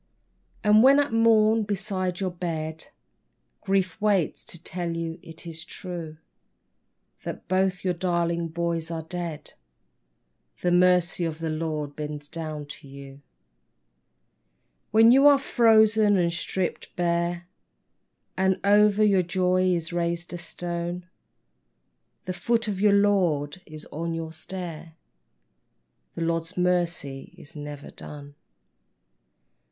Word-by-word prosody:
And 210 0 +6
when 275 +3 +7
at 285 -5 0
morn 225 -1 +4
beside 195 -3 -2
your 185 -1 -1
bed 160 -3 -4 0.8
Grief 195 0 0
waits 200 -6 +1
to - - -7
tell 170 0 -4
you 165 +1 -4
it 165 +1 -10
is 165 -1 -7
true, 170 -3 -7 1.0
That - - -7
both 185 0 +1
your 185 -1 +1
darling 170 -1 0
boys 165 0 -2
are 165 -1 -4
dead; 170 -2 -6 1.1
The 175 - +1
Mercy 180 -1 +3
of 160 -2 -2
the 165 -1 -3
Lord 155 -2 -3
bends 150 -1 -6
down 155 -2 -5
to 145 0 -11
you. 135 0 -11 1.7
When 225 +2 +6
you 270 +3 +7
are 285 -1 +7
frozen 220 -5 +4
and 170 -2 +1
stripped 180 +1 -3
bare 175 0 -1 0.9
And 190 0 +1
over 210 +1 +5
your 200 -3 +4
joy 185 +1 +1
is 170 -2 0
raised 170 0 -2
a - - -3
stone, 175 0 -4 1.2
The 185 - -3
foot 230 +4 0
of 205 -2 -2
the 205 +2 +4
Lord 185 -6 +2
is 155 0 -9
on 165 +2 -3
your 160 -1 -5
stair; 165 -1 -7 1.2
The - - -5
Lord's 165 +2 -2
mercy 175 -6 -1
is 145 - -12
never 145 -1 -8
done. 145 -1 -9
175 Hz, 125 wpm, -26 LUFS, 165-190 Hz, 1.7 s, when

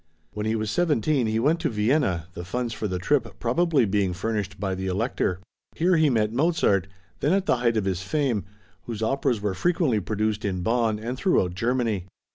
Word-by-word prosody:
When 105 0 -3
he 110 - +1
was 110 -1 -2
seventeen 150 -6 +1
he 110 0 0
went 150 +8 +2
to 165 - 0
Vienna, 105 - +1
the 85 - -6
funds 120 +5 -3
for 110 - -3
the 90 -2 -2
trip 115 +6 0
probably 140 +2 +2
being 100 -2 +1
furnished 100 0 -3
by 95 -1 -1
the 95 +1 -3
Elector. 95 -2 -1 0.4
Here 180 +2 +3
he 155 -2 +4
met 110 -3 +1
Mozart, 130 - +2 0.3
then 150 - +2
at 195 0 +1
the 130 - +2
height 120 -2 +1
of 105 - 0
his 95 -2 -1
fame, 120 0 0 0.4
whose 110 -2 -4
operas 120 -2 0
were 105 -2 -1
frequently 155 - +1
produced 105 +1 -1
in 95 -3 -1
Bonn 115 0 +1
and 120 +4 -5
throughout 95 - +2
Germany. 115 -2 0
110 Hz, 195 wpm, -25 LUFS, 100-135 Hz, 0.4 s, he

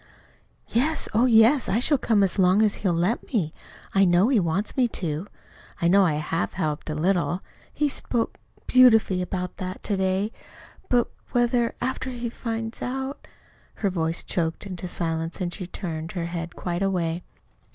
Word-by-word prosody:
"Yes, 295 +7 +1
oh, 235 +4 +4
yes. 230 +3 +5
I 205 - +2
shall 270 +3 +3
come 215 -5 +3
as 195 +1 +1
long 190 +3 +5
as 210 -1 +1
he'll 190 - +2
let 175 +7 +1
me. 175 - 0 0.4
I 195 - +5
know 180 +4 +4
he 260 -5 +4
wants 175 +4 -1
me 255 -2 +3
to. 170 -4 -4 0.5
I 170 - +2
know 195 +3 +6
I 155 - +1
HAVE 160 +3 -2
helped 155 -3 -2
a 155 - -2
little. 175 +2 0 0.3
He 295 - +1
spoke 240 -4 -1 0.3
beautifully 225 -7 +5
about 180 0 -4
that 185 +1 -6
to 205 - -1
day. 190 +2 0 0.6
But, 245 -1 +3 0.3
whether, 240 -1 +2
after 260 +1 -2
he 240 -2 -4
finds 225 -1 -4
out 265 +2 -4 0.2
" - - -33
Her 200 - +2
voice 165 -1 -1
choked 165 +2 -2
into 185 -2 -5
silence 165 -1 -2
and 175 -2 -2
she 185 -4 -5
turned 165 -3 -5
her 175 -3 -2
head 170 0 -5
quite 175 0 -3
away. 175 -3 0
190 Hz, 170 wpm, -25 LUFS, 170-230 Hz, 0.6 s, know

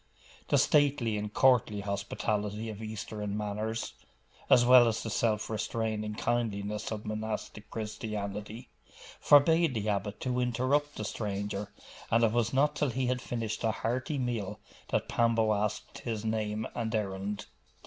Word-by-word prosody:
The - - +3
stately 140 -6 +3
and 105 0 -3
courtly 120 -5 +3
hospitality 105 +2 -2
of 105 0 -9
Eastern 105 -1 -4
manners, 105 +2 -3 0.6
as 120 -1 +7
well 125 -1 +8
as 115 -1 -1
the 115 - -4
self 105 0 +1
restraining 110 0 -2
kindliness 105 -3 -1
of 110 -1 -4
monastic 110 -1 -4
Christianity, 105 0 -5 0.5
forbade 160 0 +5
the 105 -1 -1
abbot 100 0 -2
to 125 -1 -1
interrupt 130 +4 +1
the 105 - -4
stranger; 100 -1 -3 0.4
and 115 +1 +3
it 115 - +4
was 120 0 +1
not 145 +3 +2
till 145 - +1
he 130 +2 -1
had 125 0 0
finished 115 -3 -3
a 115 - +3
hearty 130 +7 -1
meal 120 -6 -2 0.3
that - - 0
Pambo 115 -2 +2
asked 105 0 -2
his 110 -2 -4
name 110 0 -1
and 115 -1 -2
errand. 100 -1 -3
110 Hz, 145 wpm, -30 LUFS, 105-120 Hz, 0.6 s, well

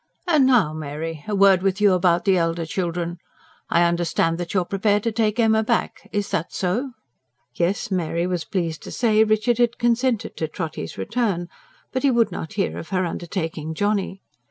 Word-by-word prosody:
"And 305 -7 +4
now, 220 -12 +4
Mary, 155 +1 -5
a 210 - -1
word 195 -2 +5
with 195 +1 0
you 205 -2 +5
about 175 -1 +2
the 195 - +4
elder 165 -1 0
children. 175 0 -3 0.5
I 170 - +4
understand 170 -1 +1
that 175 -1 -4
you 190 - +2
are - - -4
prepared 205 +2 +1
to 230 - 0
take 220 0 0
Emma 220 -1 +4
back 230 +1 -2
is 205 -1 -2
that 180 -4 -1
so?" 235 +9 -2 0.6
Yes, 180 +7 -1
Mary 170 -2 0
was 180 -2 -2
pleased 170 -4 -3
to - - -9
say 220 -2 +3
Richard 215 +2 +1
had 240 -1 +2
consented 240 -1 0
to 160 - -1
Trotty's 155 +1 -5
return; 210 -7 -1 0.4
but 260 - -1
he 280 - +3
would 235 -3 +2
not 160 - -6
hear 200 -2 -1
of - - -9
her 185 -1 0
undertaking 165 -2 -4
Johnny. 200 0 -1
190 Hz, 185 wpm, -23 LUFS, 170-220 Hz, 0.6 s, word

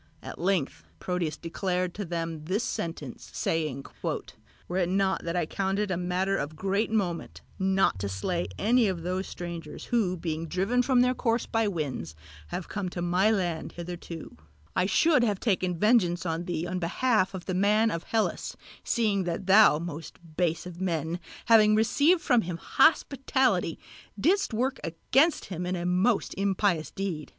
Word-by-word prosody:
At - - -8
length 180 -5 0
Proteus 180 -4 -2
declared 180 +1 -2
to 205 - -5
them 165 -2 -4
this 195 +7 0
sentence, 165 - -5
saying, 155 -5 -1 0.2
"Were 180 - -6
it 180 -2 +1
not 190 0 +1
that 170 +1 -3
I 175 - +1
count 195 +4 -1
it 205 -2 -1
a - - +1
matter 180 +2 0
of 150 +2 -4
great 195 +6 0
moment 190 -6 -2 0.2
not 190 - +2
to 100 +1 -2
slay 170 - -2
any 230 +2 +3
of 180 -4 -2
those 185 +2 -2
strangers 170 -1 -7
who 190 -6 +2
being 165 -1 -3
driven 195 +9 +1
from 250 -1 +3
their 250 0 +3
course 230 -2 0
by 225 -1 0
winds 150 - -3 0.3
have 175 - -5
come 200 -3 -3
to 175 - -5
my 180 +4 +3
land 175 -7 -1
hitherto, 170 -1 -7 0.4
I 180 - +2
should 295 +6 +4
have 205 -5 +1
taken 185 -5 0
vengeance 185 -4 +3
on 165 +1 -2
thee 170 -1 -2
on 180 +1 -3
behalf 195 +2 +1
of 180 - -7
the 185 - -2
man 210 +4 +3
of 165 0 -4
Hellas, 220 -2 -1 0.3
seeing 205 -5 +1
that 175 +2 -3
thou, 195 -4 +7
most 160 -1 -7 0.2
base 170 -1 0
of 180 0 -8
men, 165 -2 -1 0.3
having 215 -2 +6
received 290 +10 +3
from 245 -2 +3
him 175 -3 -4
hospitality, 260 - +2 0.4
didst 370 - +2
work 250 +4 -1
against 270 - +2
him 180 -1 -4
a 180 -1 -2
most 185 +6 +2
impious 195 -4 +1
deed. 180 -6 -4
185 Hz, 165 wpm, -28 LUFS, 170-215 Hz, 0.4 s, thou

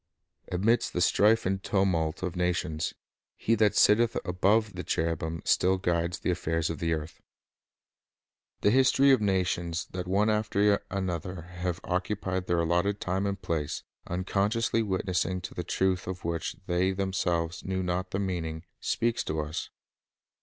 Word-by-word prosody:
Amidst 105 +7 +2
the - - -1
strife 105 +5 +4
and 95 +1 0
tumult 95 -6 0
of 90 -1 -2
nations, 90 -3 -1 0.4
He' 115 - 0
that 105 -2 +3
sitteth 115 +2 +4
above 100 +4 +2
the 90 0 -5
cherubim 80 0 -2
still 95 +1 +3
guides 85 -2 0
the - - -1
affairs 80 -2 -1
of 80 - -6
the 85 -1 -1
earth. 80 0 -5 1.4
The 105 - +4
history 135 +2 +5
of 130 -4 +4
nations 90 -4 0
that 90 -1 -4
one 100 +3 +2
after 105 -1 +2
another 90 -2 -3
have 90 0 -4
occupied 95 0 -2
their 85 -1 +2
allotted 90 +5 +1
time 95 +2 -1
and 100 -1 -2
place, 80 -5 -2 0.2
unconsciously 100 +6 0
witnessing 95 -3 -1
to - - -7
the - - -4
truth 95 -1 0
of 90 -2 -5
which 85 -1 -2
they 90 +2 +1
themselves 90 -3 -1
knew 95 0 -2
not 90 +1 -2
the 95 - -2
meaning, 85 -5 -3 0.2
speaks 115 0 0
to 80 - -2
us. 75 +2 -4
90 Hz, 150 wpm, -28 LUFS, 85-100 Hz, 1.4 s, history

